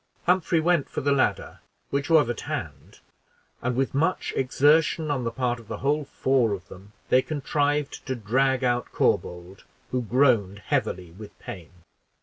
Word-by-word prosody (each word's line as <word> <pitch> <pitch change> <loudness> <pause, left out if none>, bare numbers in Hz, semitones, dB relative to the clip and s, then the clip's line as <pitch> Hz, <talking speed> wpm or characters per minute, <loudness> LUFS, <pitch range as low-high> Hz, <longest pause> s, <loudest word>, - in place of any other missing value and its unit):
Humphrey 180 -2 +2
went 170 -2 +1
for - - -4
the 140 - +1
ladder, 140 -1 0 0.3
which 140 +2 -1
was 155 -6 +5
at 120 -2 -3
hand, - - -6 0.6
and, 125 0 -1
with 135 +1 0
much 160 +7 0
exertion 150 +4 +2
on 130 -4 -1
the - - +1
part 125 0 -1
of 115 - -15
the - - -5
whole 145 +2 0
four 130 -5 +1
of 95 -3 -7
them, 100 +3 -13 0.2
they 130 - +5
contrived 145 0 -1
to 130 - -1
drag 130 +4 +1
out 120 -1 0
Corbould, 90 +2 -1 0.3
who 125 - 0
groaned 115 -5 +2
heavily 90 -2 -2
with 105 +4 -12
pain. 85 -5 -9
130 Hz, 160 wpm, -25 LUFS, 110-145 Hz, 0.6 s, was